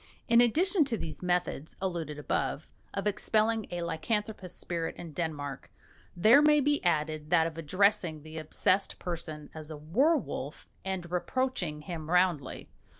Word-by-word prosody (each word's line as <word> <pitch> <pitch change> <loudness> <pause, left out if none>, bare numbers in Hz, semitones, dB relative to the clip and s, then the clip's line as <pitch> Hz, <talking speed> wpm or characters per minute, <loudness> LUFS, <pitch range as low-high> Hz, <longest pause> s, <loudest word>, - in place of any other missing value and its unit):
In 235 0 +6
addition 330 - +4
to 240 -4 -1
these 155 -6 -6
methods 175 -4 -1
(alluded 170 -5 -3
to 150 - -7
above) 140 - -2 0.2
of 200 - -3
expelling 215 +1 +1
a 175 0 -3
lycanthropous 205 +4 -2
spirit 165 -2 -3
in 165 -3 -8
Denmark, 145 -4 -4 0.5
there 225 +10 +7
may 300 0 +6
be 290 +1 +2
added 155 -3 0
that 165 -2 +4
of 165 -1 -3
addressing 175 -1 +1
the 160 +1 -7
obsessed 185 +5 +1
person 160 -4 -5
as 155 -1 -7
a 155 - -6
werwolf 185 - 0 0.2
and 185 -3 -4
reproaching 180 -5 -1
him 160 -1 -6
roundly. 180 -6 +1
175 Hz, 150 wpm, -30 LUFS, 155-215 Hz, 0.5 s, there